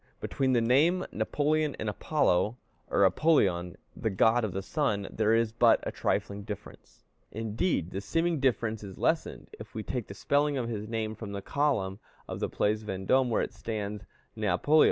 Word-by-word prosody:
Between 130 Hz, -1 st, 0 dB
the 120 Hz, -, +3 dB
name 150 Hz, +10 st, +3 dB
Napoleon 150 Hz, -1 st, 0 dB
and 110 Hz, -, -4 dB
Apollo, 105 Hz, -, +1 dB, 0.3 s
or 100 Hz, -, +4 dB
Apoleon, 95 Hz, -, +2 dB, 0.2 s
the 110 Hz, -, -1 dB
god 110 Hz, +4 st, +3 dB
of 105 Hz, -, -1 dB
the 95 Hz, +2 st, -4 dB
sun, 100 Hz, -7 st, -1 dB
there 110 Hz, +1 st, +2 dB
is 115 Hz, -1 st, +2 dB
but 115 Hz, -, +5 dB
a -, -, -3 dB
trifling 100 Hz, 0 st, -1 dB
difference; 105 Hz, 0 st, -10 dB, 0.3 s
indeed, 110 Hz, -, -1 dB
the 95 Hz, -, -4 dB
seeming 165 Hz, -, 0 dB
difference 115 Hz, -5 st, 0 dB
is 95 Hz, -2 st, -9 dB
lessened, -, -, -1 dB
if -, -, -11 dB
we 110 Hz, -, -3 dB
take 125 Hz, -2 st, -4 dB
the 100 Hz, -, -9 dB
spelling 145 Hz, +4 st, +1 dB
of 120 Hz, -3 st, -2 dB
his 110 Hz, -2 st, -4 dB
name 110 Hz, -1 st, -2 dB
from 110 Hz, -2 st, -7 dB
the 100 Hz, -, -4 dB
column 110 Hz, -10 st, 0 dB, 0.3 s
of -, -, -5 dB
the -, -, -1 dB
Place 105 Hz, +1 st, 0 dB
Vendôme, 105 Hz, +6 st, +1 dB
where 115 Hz, -, +1 dB
it -, -, -5 dB
stands 105 Hz, -2 st, -4 dB, 0.3 s
Néapoleó. 155 Hz, +2 st, +2 dB
110 Hz, 175 wpm, -29 LUFS, 100-135 Hz, 0.3 s, but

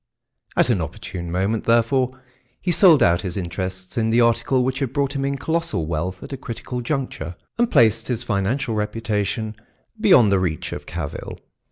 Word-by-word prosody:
At -, -, +4 dB
an -, -, +1 dB
opportune 85 Hz, -2 st, -6 dB
moment, 95 Hz, +5 st, 0 dB
therefore, 125 Hz, +3 st, +2 dB, 0.4 s
he 180 Hz, -, -1 dB
sold 170 Hz, -4 st, +6 dB
out 85 Hz, +1 st, +3 dB
his 90 Hz, -1 st, -4 dB
interests 95 Hz, +2 st, -4 dB
in 110 Hz, 0 st, +1 dB
the 115 Hz, +2 st, +3 dB
article 120 Hz, +2 st, +3 dB
which 130 Hz, +1 st, -1 dB
had 135 Hz, -5 st, -2 dB
brought 140 Hz, 0 st, 0 dB
him 135 Hz, -, -1 dB
in 140 Hz, 0 st, -1 dB
colossal 165 Hz, -, -1 dB
wealth 85 Hz, +3 st, -3 dB
at -, -, -8 dB
a -, -, -4 dB
critical 125 Hz, 0 st, -5 dB
juncture 120 Hz, -, -3 dB, 0.2 s
and 240 Hz, -1 st, +3 dB
placed 115 Hz, -, +4 dB
his 120 Hz, -2 st, -2 dB
financial 115 Hz, +5 st, -1 dB
reputation 105 Hz, 0 st, -2 dB, 0.4 s
beyond 180 Hz, -, +6 dB
the 100 Hz, -, +4 dB
reach 85 Hz, -4 st, -2 dB
of -, -, -7 dB
cavil. 80 Hz, -4 st, -5 dB
115 Hz, 175 wpm, -22 LUFS, 95-135 Hz, 0.4 s, sold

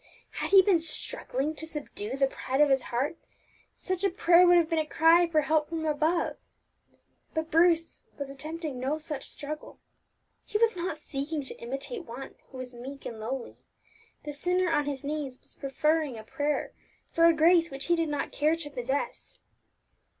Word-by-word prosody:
Had -, -, -3 dB
he 390 Hz, -1 st, +8 dB
been 370 Hz, -3 st, +4 dB
struggling 300 Hz, -3 st, -2 dB
to 320 Hz, +1 st, -8 dB
subdue 270 Hz, -6 st, -5 dB
the 275 Hz, -, +4 dB
pride 265 Hz, 0 st, -3 dB
of 295 Hz, -2 st, +5 dB
his 265 Hz, -1 st, +4 dB
heart, 270 Hz, +7 st, -1 dB, 0.6 s
such 370 Hz, 0 st, -3 dB
a 395 Hz, -, +4 dB
prayer 355 Hz, -1 st, +5 dB
would 350 Hz, 0 st, +7 dB
have 335 Hz, -2 st, +4 dB
been 325 Hz, -1 st, +1 dB
a 310 Hz, -, 0 dB
cry 330 Hz, +3 st, +5 dB
for 315 Hz, -2 st, +2 dB
help 305 Hz, +1 st, +1 dB
from 325 Hz, -1 st, -3 dB
above; 315 Hz, +3 st, 0 dB, 1.0 s
but 320 Hz, 0 st, -2 dB
Bruce 330 Hz, 0 st, +3 dB, 0.2 s
was 280 Hz, -, -4 dB
attempting 300 Hz, 0 st, -5 dB
no 270 Hz, +4 st, -1 dB
such 300 Hz, -3 st, -6 dB
struggle. 300 Hz, +1 st, -7 dB, 0.7 s
He 420 Hz, -, -2 dB
was 455 Hz, -1 st, +3 dB
not 345 Hz, -2 st, -3 dB
seeking 295 Hz, 0 st, -4 dB
to 265 Hz, -, -8 dB
imitate 275 Hz, -, -5 dB
One 255 Hz, +4 st, -8 dB, 0.2 s
who 265 Hz, -, -10 dB
was 255 Hz, -1 st, -6 dB
meek 265 Hz, +3 st, -9 dB
and 225 Hz, -2 st, -6 dB
lowly; 240 Hz, +3 st, -5 dB, 0.7 s
the 295 Hz, -, -5 dB
sinner 360 Hz, +4 st, +1 dB
on 295 Hz, -2 st, +2 dB
his 280 Hz, -2 st, -4 dB
knees 280 Hz, -3 st, -3 dB
was -, -, -11 dB
preferring 300 Hz, -1 st, 0 dB
a 220 Hz, -, -8 dB
prayer 290 Hz, +6 st, -2 dB, 0.4 s
for 330 Hz, -, +4 dB
a 335 Hz, -, +8 dB
grace 335 Hz, +1 st, +5 dB
which 275 Hz, -1 st, -6 dB
he 345 Hz, -, +3 dB
did 330 Hz, -2 st, 0 dB
not 290 Hz, -1 st, -2 dB
care 305 Hz, +2 st, +2 dB
to 310 Hz, -3 st, -6 dB
possess. 265 Hz, +1 st, -3 dB
305 Hz, 180 wpm, -28 LUFS, 275-330 Hz, 1.0 s, he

